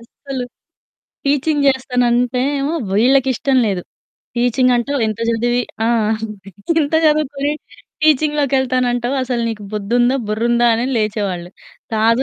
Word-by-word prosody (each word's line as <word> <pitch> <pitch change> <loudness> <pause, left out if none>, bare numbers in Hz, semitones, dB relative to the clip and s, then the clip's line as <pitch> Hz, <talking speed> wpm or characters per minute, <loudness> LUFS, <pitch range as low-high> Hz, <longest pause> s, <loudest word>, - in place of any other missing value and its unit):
అస్సలు. 255 +2 -7 0.8
టీచింగ్ 290 +1 +1
జేస్తానంటే 250 -2 +1 0.2
ఏమో, 285 +4 -1 0.2
వీళ్ళకిష్టం 260 +4 +2
లేదు. 190 -4 -1 0.5
టీచింగంటావు 245 +2 +2
ఇంత 215 0 -3
జదివి 240 +2 +1 0.2
ఆ! - - +2 0.4
అంతే. 205 -2 -9 0.3
ఇంత 290 0 -1
జదువుకొని 295 -2 +1 0.5
టీచింగ్‌లోకెళ్తానంటావు, 265 -4 +1
అసలు 250 -2 -2
నీకు 220 -2 -5
బుద్దుందా, 240 +5 +1
బుర్రుందా, 235 +3 +2
అని 235 +2 -1
లేచేవాళ్ళు. 200 -5 -2 0.4
కాదు 230 +3 +3
245 Hz, 105 wpm, -18 LUFS, 225-275 Hz, 0.8 s, కాదు